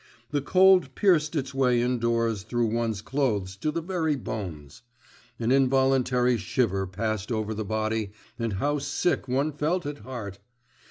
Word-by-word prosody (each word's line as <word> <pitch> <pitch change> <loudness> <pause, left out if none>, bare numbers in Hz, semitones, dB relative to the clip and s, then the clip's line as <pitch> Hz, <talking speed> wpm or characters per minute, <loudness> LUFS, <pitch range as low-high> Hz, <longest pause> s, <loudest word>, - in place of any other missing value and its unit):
The 145 -1 0
cold 185 -3 +4
pierced 170 -6 +3
its 140 -2 -2
way 125 -3 +2
indoors 115 -3 0
through 120 +3 -1
one's 115 -3 -1
clothes 110 -10 -1
to 155 - -1
the 165 +2 -3
very 165 -4 0
bones. 90 - -6 0.6
An 115 +1 0
involuntary 130 -2 +3
shiver 95 -1 0
passed 105 +3 -3
over 110 -1 -1
the 110 0 -3
body, 110 0 -2 0.3
and 115 -2 -1
how 145 +9 0
sick 145 +1 -1
one 135 +4 0
felt 160 +5 -1
at 145 0 -5
heart! 110 -7 -7
125 Hz, 150 wpm, -26 LUFS, 110-145 Hz, 0.6 s, cold